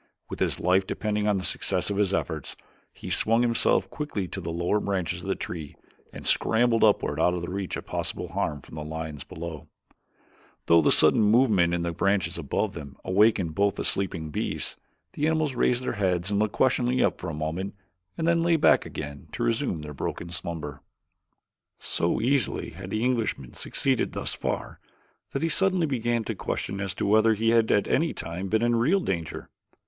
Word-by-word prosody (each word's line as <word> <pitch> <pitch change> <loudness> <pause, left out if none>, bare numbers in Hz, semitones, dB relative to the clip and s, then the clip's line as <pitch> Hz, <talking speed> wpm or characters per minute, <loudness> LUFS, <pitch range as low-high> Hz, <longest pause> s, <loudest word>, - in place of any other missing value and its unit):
With - - -5
his - - 0
life 95 +2 +2
depending 105 -1 -1
upon 105 -2 +2
the 95 - -3
success 100 - 0
of 100 - -2
his 100 -2 +2
efforts, 80 -6 -3 0.4
he - - -8
swung 115 +2 +3
himself 115 -1 +2
quickly 140 -11 -3
to 95 - -5
the 85 - -5
lower 85 +5 0
branches 95 -5 -2
of - - -8
the - - 0
tree 80 -4 -6 0.4
and - - -10
scrambled 115 0 +3
upward 100 -8 +3
out 90 +2 +3
of 85 - -4
reach 95 0 -3
of - - -8
possible - - -4
harm 75 - -2
from - - -15
the 75 -1 -5
lions 80 -2 -6
below 80 -1 -8 1.0
though 85 0 +6
the 75 - +3
sudden - - +6
movement 105 -5 +4
in 85 0 0
the 85 - -1
branches 100 +3 0
above - - -2
them 70 -2 -9
awakened 95 -3 +3
both 100 +3 +2
the - - -4
sleeping 85 -5 -1
beasts. - - -3 0.4
The 150 - 0
animals 155 -3 +1
raised 125 0 +1
their - - -1
heads 95 -2 0
and 100 - +1
looked 105 -1 0
questioningly 130 -1 +2
up - - 0
for - - -4
a 80 - -4
moment 80 +6 -3 0.4
and 165 - -1
then 170 0 +3
lay 170 0 +3
back 160 - +4
again 70 0 -7
to - - -2
resume 115 - 0
their 75 0 -7
broken 85 +4 -5
slumber. 75 -4 -5 1.0
So 85 - -1
easily 130 0 +1
had 90 +3 -9
the 110 +3 -1
Englishman 115 - -1
succeeded 130 -3 0
thus - - -2
far - - -4 0.5
that 135 - -3
he 165 - +2
suddenly 185 +2 +3
began 120 -4 0
to 110 - -3
question 100 0 -3
as 95 -1 -3
to - - -2
whether 110 +2 +4
he 115 +2 +1
had 115 -1 +3
at 100 - +3
any 165 +4 +1
time 85 +4 -5
been 110 +3 +1
in 120 0 +3
real 155 +13 +3
danger. 85 - -4
100 Hz, 195 wpm, -26 LUFS, 85-115 Hz, 1.0 s, though